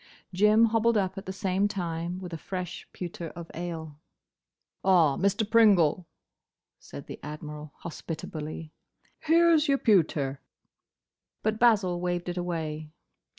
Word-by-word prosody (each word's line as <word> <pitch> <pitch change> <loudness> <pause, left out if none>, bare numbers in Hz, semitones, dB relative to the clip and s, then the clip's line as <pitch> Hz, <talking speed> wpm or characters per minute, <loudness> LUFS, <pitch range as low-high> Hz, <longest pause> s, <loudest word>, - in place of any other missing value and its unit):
Jim 210 +4 +5
hobbled 230 0 +2
up 190 -1 0
at 195 0 -8
the - - -2
same 190 0 0
time 175 -3 -3
with 180 -2 -8
a - - -3
fresh 180 0 -6
pewter 175 -1 -6
of 170 0 -9
ale. 160 -3 -6 0.8
"Ah, 170 -7 +4
Mr. 200 - +1
Pringle," 195 -7 +4 0.7
said - - -10
the - - -9
Admiral, 150 0 -8
hospitably, 160 -1 -6 0.5
"here 335 +1 +4
's 305 0 +2
your 275 -1 +3
pewter." 155 - +2 1.0
But 220 0 0
Basil 195 -7 +3
waved 175 0 -2
it 175 - -4
away. 160 -3 -3
180 Hz, 130 wpm, -28 LUFS, 160-210 Hz, 1.0 s, Jim